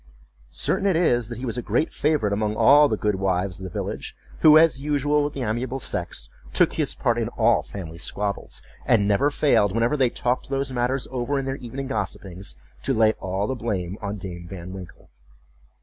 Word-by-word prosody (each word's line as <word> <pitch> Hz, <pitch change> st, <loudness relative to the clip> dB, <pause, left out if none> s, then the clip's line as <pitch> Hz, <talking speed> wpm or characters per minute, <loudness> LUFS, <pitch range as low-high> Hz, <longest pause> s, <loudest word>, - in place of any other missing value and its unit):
Certain 200 Hz, -, 0 dB
it 190 Hz, -, +3 dB
is, 120 Hz, -9 st, +2 dB
that 120 Hz, -, -6 dB
he 130 Hz, -, -5 dB
was 115 Hz, -1 st, -2 dB
a -, -, -2 dB
great 120 Hz, +8 st, 0 dB
favorite 145 Hz, -9 st, +1 dB
among 105 Hz, +1 st, 0 dB
all 145 Hz, +5 st, +6 dB
the 110 Hz, -, 0 dB
good 105 Hz, -2 st, 0 dB
wives 95 Hz, -1 st, -1 dB
of 95 Hz, -, -7 dB
the -, -, -5 dB
village, -, -, -5 dB, 0.2 s
who, 155 Hz, -1 st, +8 dB
as 155 Hz, -5 st, +4 dB
usual, 145 Hz, 0 st, +1 dB
with 145 Hz, 0 st, -2 dB
the 135 Hz, -, -4 dB
amiable 120 Hz, +4 st, -2 dB
sex, 85 Hz, -, -4 dB, 0.3 s
took -, -, +3 dB
his -, -, -1 dB
part 120 Hz, 0 st, +1 dB
in 115 Hz, -, -1 dB
all 115 Hz, 0 st, +4 dB
family 85 Hz, -4 st, -8 dB
squabbles; 100 Hz, +2 st, -3 dB, 0.2 s
and 100 Hz, -3 st, +4 dB
never 105 Hz, +8 st, +3 dB
failed, 140 Hz, -9 st, +3 dB
whenever 115 Hz, +5 st, +2 dB
they 130 Hz, -4 st, +3 dB
talked 125 Hz, +2 st, -1 dB
those 135 Hz, -1 st, -1 dB
matters 125 Hz, +2 st, 0 dB
over 130 Hz, +2 st, -1 dB
in 135 Hz, -, -2 dB
their 135 Hz, 0 st, -3 dB
evening 130 Hz, +2 st, -6 dB
gossipings, 100 Hz, -, -4 dB, 0.3 s
to 135 Hz, -, 0 dB
lay 110 Hz, -1 st, +4 dB
all 95 Hz, +2 st, -2 dB
the 130 Hz, -, -1 dB
blame 100 Hz, -7 st, -3 dB
on 105 Hz, 0 st, -4 dB
Dame 85 Hz, -3 st, -7 dB
Van 90 Hz, 0 st, -8 dB
Winkle. 90 Hz, -9 st, -11 dB
115 Hz, 200 wpm, -24 LUFS, 100-135 Hz, 0.3 s, who